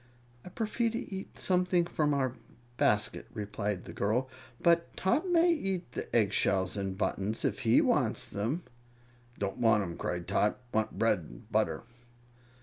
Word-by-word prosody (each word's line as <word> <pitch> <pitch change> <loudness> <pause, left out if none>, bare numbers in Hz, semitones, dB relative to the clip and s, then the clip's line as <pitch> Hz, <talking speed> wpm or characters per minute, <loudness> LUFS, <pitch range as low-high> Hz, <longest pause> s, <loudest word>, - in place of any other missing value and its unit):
"I - - -9
prefer 225 +4 -1
to 230 -2 -5
eat 190 0 -7
something 180 -1 +2
from 150 -3 0
our 130 -3 +1 0.4
basket," 105 -1 +1
replied 105 -2 -3
the - - -8
girl. 115 +6 0 0.3
"But 170 0 +2
Tot 275 - +1
may 345 0 +5
eat 190 - -3
the - - -5
egg 105 -4 +4
shells 95 -1 +2
and 95 -2 -3
buttons, 105 +1 -1
if - - 0
he - - +4
wants - - +2
them." 120 - -2 0.7
"Don't 100 -1 -3
want 110 -3 +4
'em!" 85 -3 -6
cried 90 -1 -3
Tot. 100 +2 +2 0.2
"Want 110 0 0
bread 115 -4 +3
and - - -13
butter." - - +1
115 Hz, 155 wpm, -31 LUFS, -, 0.7 s, may